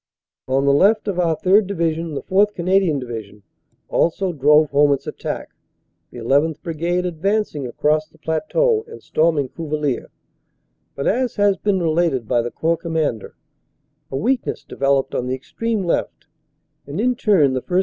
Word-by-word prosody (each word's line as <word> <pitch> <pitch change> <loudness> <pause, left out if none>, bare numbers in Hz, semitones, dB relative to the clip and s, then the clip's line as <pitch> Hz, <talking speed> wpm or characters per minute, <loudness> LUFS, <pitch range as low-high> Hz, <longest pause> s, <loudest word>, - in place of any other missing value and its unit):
On 135 +1 +1
the 140 - +4
left 210 +9 +3
of 190 -3 -1
our 165 -2 +2
3rd. 195 +2 +3
Division 165 -4 -2
the - - -4
4th. 205 +2 +2
Canadian 180 -3 +2
Division 110 -5 -7 0.4
also 180 +2 0
drove 150 +1 +4
home 145 +1 +4
its 140 - -4
attack, - - -5 0.6
the 120 - -10
1 135 +5 +4
1th. 160 -1 -4
Brigade 170 +2 -1
advancing 180 -4 -1
across 155 +5 0
the - - -24
plateau 430 - 0
and 460 - -12
storming 155 -4 +1
Cuvillers. 150 -4 -3 0.9
But, 140 - -4
as 250 +2 0
has 205 -1 +3
been 200 -1 0
related 160 -7 0
by 120 0 +2
the 120 - -3
Corps 165 +6 0
Commander, 160 - -2 0.7
a 135 - -3
weakness 245 - -1
developed 135 0 0
on 125 - -2
the 130 - -1
extreme 220 - -3
left, 170 - -2 0.6
and 145 +6 -5
in 250 +3 +2
turn 190 - +3
the 130 - -1
1st. 180 +5 0
160 Hz, 160 wpm, -20 LUFS, 140-195 Hz, 0.9 s, the